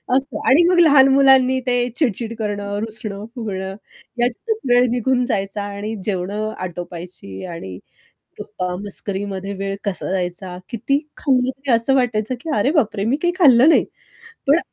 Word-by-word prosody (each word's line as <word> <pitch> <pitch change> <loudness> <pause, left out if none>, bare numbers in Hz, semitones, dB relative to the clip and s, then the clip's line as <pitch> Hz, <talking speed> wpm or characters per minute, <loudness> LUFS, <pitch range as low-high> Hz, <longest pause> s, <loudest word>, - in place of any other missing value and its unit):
असं. 270 -3 -1
आणि 295 +6 +6
मग 360 -1 +3
लहान 285 -5 +7
मुलांनी 265 -1 +5
ते 245 -1 +2
चिड-चिड 230 -5 0
करणं, 205 -1 -3
रुसणं 215 -2 -6
फुगणं 195 -5 -4 0.4
ह्याच्यातच 250 - -1
वेळ 245 +1 +5
निघून 250 +1 +1
जायचा 200 -4 -2
आणि 205 +2 -5
जेवण 190 -2 -2 0.3
आटोपायची 175 - -7
आणि 165 - -7 0.6
गप्पा, 180 -1 -4
मस्करीमध्ये 200 -1 -3
वेळ 195 0 -2
कसा 200 -3 -3
जायचा? 180 0 -3
किती 245 +5 0 0.2
खाल्लं 260 -3 +1
तरी 275 0 -4
असं 230 +3 +3
वाटायचं 245 -3 0
की 320 - -6
"अरे 210 +6 +2
बापरे! 215 - +1
मी 240 +6 +1
काही 350 0 +2
खाल्लं 265 -5 +7
नाही." 330 - +5 0.6
पण, 290 +4 +6
225 Hz, 145 wpm, -20 LUFS, 195-260 Hz, 0.6 s, लहान